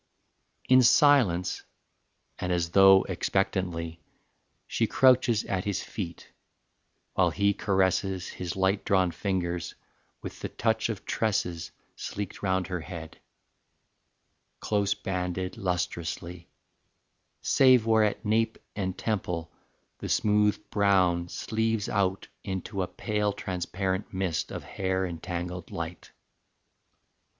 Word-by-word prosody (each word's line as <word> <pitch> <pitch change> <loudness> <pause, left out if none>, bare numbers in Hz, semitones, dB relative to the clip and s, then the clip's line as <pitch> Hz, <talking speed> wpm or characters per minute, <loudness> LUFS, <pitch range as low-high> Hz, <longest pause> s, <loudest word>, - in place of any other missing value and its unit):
XII. 130 - +4
In 130 - +8
silence 120 - +4 0.8
and 90 - -2
as 85 -1 0
though 95 0 +7
expectantly 90 -3 -2 0.6
She - - 0
crouches 125 -4 +4
at 95 -2 -2
his 100 -2 -1
feet, 85 -5 -7 0.8
while - - +3
he 100 0 +2
caresses 95 -1 0
His 90 -1 -5
light 95 +1 +1
drawn 95 -2 +2
fingers 90 -3 -2 0.5
with - - -7
the - - -4
touch 110 0 0
of 105 -4 -5
tresses 100 -7 -1 0.3
Sleeked 100 -2 -6
round 95 -2 +1
her 90 -1 -3
head, 80 -1 -8 1.4
close 100 -1 0
banded 90 -2 -3
lustrously, 85 -1 -3 0.9
Save 130 -4 +5
where 110 -1 +4
at 105 +1 -1
nape 110 +1 +1 0.2
and 95 -3 -3
temple 90 -6 -2 0.5
the - - -5
smooth 105 0 +3
brown 95 -4 +3
Sleaves 110 0 -1
out 95 -1 0 0.2
into 95 0 -3
a 90 - -1
pale 105 -1 -1
transparent 95 0 -3
mist 95 -5 -2
Of - - -5
hair 95 -1 -1
and 85 -3 -6
tangled 90 0 -5
light. 85 0 -6
95 Hz, 115 wpm, -28 LUFS, 90-105 Hz, 1.4 s, In